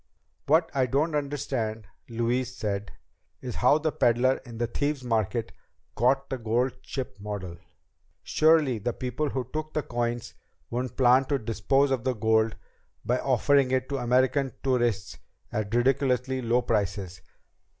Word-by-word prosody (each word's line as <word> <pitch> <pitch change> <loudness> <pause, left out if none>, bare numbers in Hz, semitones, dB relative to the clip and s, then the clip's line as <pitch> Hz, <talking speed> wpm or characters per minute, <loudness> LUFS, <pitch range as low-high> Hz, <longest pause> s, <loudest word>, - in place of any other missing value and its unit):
"What 160 +3 +3
I 130 -2 +2
don't 150 +6 +1
understand," 135 -7 -2 0.2
Louise 120 +2 -1
said, 100 -1 -3 0.5
"is 125 -2 -6
how 125 +4 +5
the 155 0 -1
peddler 125 0 +2
in 115 -1 -9
the 120 - 0
Thieves' 145 +3 -2
Market 115 -1 -1 0.4
got 135 +4 +1
the 130 - -2
gold 120 +3 0
ship 125 -7 -5
model. 100 -4 -6 0.7
Surely 155 -6 +3
the 120 +4 -2
people 130 +5 -2
who 130 -4 -3
took 155 0 -4
the 155 - 0
coins 120 -1 -3 0.4
wouldn't 125 0 -3
plan 130 +1 +5
to 140 +1 0
dispose 125 +4 +1
of 130 -4 0
the 130 -1 0
gold 110 0 +2 0.5
by 125 +1 +1
offering 135 +1 +3
it 130 0 0
to 140 - -1
American 130 +2 +2
tourists 120 -7 0 0.3
at 105 +1 -2
ridiculously 130 0 +1
low 120 +1 +1
prices." 100 -4 -2
125 Hz, 145 wpm, -27 LUFS, 115-135 Hz, 0.7 s, how